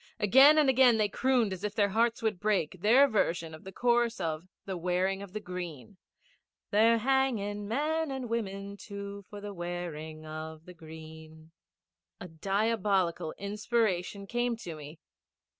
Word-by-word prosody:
Again 270 Hz, +9 st, +7 dB
and 300 Hz, -2 st, +5 dB
again 255 Hz, -3 st, +5 dB
they 210 Hz, -1 st, +2 dB
crooned 240 Hz, -3 st, +1 dB
as 190 Hz, +1 st, -8 dB
if 210 Hz, 0 st, -3 dB
their 205 Hz, -1 st, +3 dB
hearts 230 Hz, +3 st, +1 dB
would 215 Hz, -5 st, 0 dB
break, 185 Hz, -5 st, 0 dB
their 245 Hz, +7 st, +6 dB
version 170 Hz, -, 0 dB
of 155 Hz, -, -11 dB
the 190 Hz, -, -9 dB
chorus 240 Hz, +1 st, +1 dB
of 165 Hz, 0 st, -3 dB, 0.2 s
the 190 Hz, -, -4 dB
Wearing 180 Hz, +2 st, 0 dB
of 200 Hz, -2 st, -9 dB
the 215 Hz, -, -3 dB
Green 180 Hz, -3 st, -7 dB, 0.7 s
They're 225 Hz, +2 st, +5 dB
hanging 225 Hz, -5 st, 0 dB
men 305 Hz, +7 st, 0 dB
and 265 Hz, -2 st, -4 dB
women 200 Hz, -3 st, -4 dB
too, 200 Hz, -1 st, -8 dB
For 205 Hz, -, -8 dB
the 205 Hz, 0 st, -7 dB
wearing 170 Hz, -3 st, -6 dB
of 155 Hz, +1 st, -7 dB
the 180 Hz, -, -11 dB
green. 160 Hz, -1 st, -12 dB, 0.7 s
A 180 Hz, -, -7 dB
diabolical 195 Hz, -1 st, 0 dB
inspiration 200 Hz, -2 st, -1 dB
came 240 Hz, +2 st, -1 dB
to 175 Hz, -7 st, -7 dB
me. 150 Hz, +1 st, -10 dB
200 Hz, 155 wpm, -30 LUFS, 175-230 Hz, 0.7 s, Again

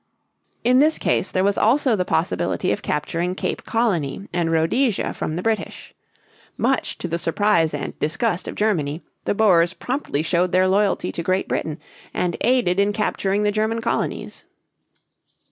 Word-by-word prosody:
In 250 Hz, +2 st, +4 dB
this 310 Hz, +3 st, +4 dB
case -, -, 0 dB
there 185 Hz, -, 0 dB
was 200 Hz, 0 st, +2 dB
also 250 Hz, +1 st, +3 dB
the 185 Hz, -, 0 dB
possibility -, -, 0 dB
of -, -, -2 dB
capturing 170 Hz, +4 st, -2 dB
Cape -, -, -3 dB
Colony 200 Hz, -, -1 dB
and 170 Hz, -2 st, 0 dB
Rhodesia 195 Hz, +9 st, +1 dB
from 155 Hz, -, -3 dB
the 180 Hz, -, -3 dB
British. 225 Hz, -1 st, -3 dB, 0.6 s
Much -, -, 0 dB
to -, -, -4 dB
the 170 Hz, 0 st, -2 dB
surprise 170 Hz, -1 st, +2 dB
and 145 Hz, -, -5 dB
disgust 180 Hz, +4 st, -1 dB
of -, -, -5 dB
Germany, 165 Hz, -8 st, 0 dB, 0.2 s
the -, -, 0 dB
Boers 185 Hz, -5 st, +4 dB
promptly 250 Hz, -, -2 dB
showed 175 Hz, +2 st, +1 dB
their 185 Hz, +1 st, +4 dB
loyalty 200 Hz, +1 st, +1 dB
to -, -, -4 dB
Great 185 Hz, +2 st, 0 dB
Britain 155 Hz, -1 st, -2 dB, 0.4 s
and 175 Hz, -2 st, 0 dB
aided 235 Hz, -7 st, +2 dB
in 200 Hz, +1 st, +2 dB
capturing 205 Hz, -1 st, 0 dB
the 210 Hz, -, +2 dB
German 220 Hz, +2 st, 0 dB
colonies. 230 Hz, 0 st, -3 dB
190 Hz, 160 wpm, -22 LUFS, 170-220 Hz, 0.6 s, In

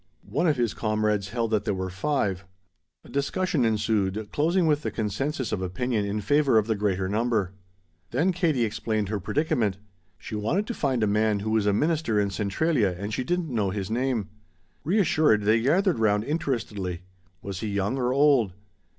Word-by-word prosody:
One 140 Hz, -, 0 dB
of 150 Hz, -4 st, +2 dB
his 120 Hz, -3 st, 0 dB
comrades 105 Hz, -2 st, 0 dB
held 115 Hz, 0 st, -2 dB
that 110 Hz, -2 st, +1 dB
there 105 Hz, -4 st, -1 dB
were 95 Hz, 0 st, -3 dB
five. 95 Hz, -4 st, -1 dB, 0.6 s
A -, -, -15 dB
discussion 145 Hz, +1 st, 0 dB
ensued 110 Hz, -2 st, 0 dB
closing 170 Hz, +4 st, +2 dB
with 150 Hz, -2 st, +2 dB
the -, -, -2 dB
consensus 120 Hz, +4 st, -2 dB
of 95 Hz, -, -2 dB
opinion 105 Hz, +4 st, -1 dB
in 105 Hz, +1 st, -2 dB
favor 140 Hz, +2 st, +3 dB
of 110 Hz, -, +3 dB
the 110 Hz, -, +1 dB
greater 100 Hz, -3 st, -1 dB
number. 110 Hz, -2 st, 0 dB, 0.6 s
Then 160 Hz, -, +1 dB
Katie 165 Hz, -9 st, +1 dB
explained 110 Hz, -1 st, -2 dB
her 105 Hz, -1 st, -1 dB
predicament; 110 Hz, -, 0 dB, 0.4 s
she -, -, -10 dB
wanted 115 Hz, -, 0 dB
to 240 Hz, -, -4 dB
find 130 Hz, -, 0 dB
a -, -, +4 dB
man 105 Hz, 0 st, +1 dB
who 110 Hz, +1 st, -2 dB
was 110 Hz, -2 st, +2 dB
a -, -, +4 dB
minister 150 Hz, -2 st, +1 dB
in 100 Hz, -1 st, 0 dB
Centralia 105 Hz, -, 0 dB
and 100 Hz, +3 st, -5 dB
she 130 Hz, -, -1 dB
didn't 170 Hz, 0 st, -2 dB
know 105 Hz, -4 st, +1 dB
his 100 Hz, +1 st, -4 dB
name. 120 Hz, -3 st, -1 dB, 0.5 s
Reassured, 155 Hz, -, +3 dB
they 110 Hz, +2 st, +3 dB
gathered 170 Hz, -, +2 dB
round 105 Hz, -1 st, +2 dB
interestedly. 110 Hz, -, -3 dB, 0.4 s
Was 95 Hz, -2 st, -5 dB
he 110 Hz, -, -3 dB
young 100 Hz, +4 st, -1 dB
or 125 Hz, 0 st, +1 dB
old? 135 Hz, -8 st, +3 dB
110 Hz, 180 wpm, -26 LUFS, 100-140 Hz, 0.6 s, a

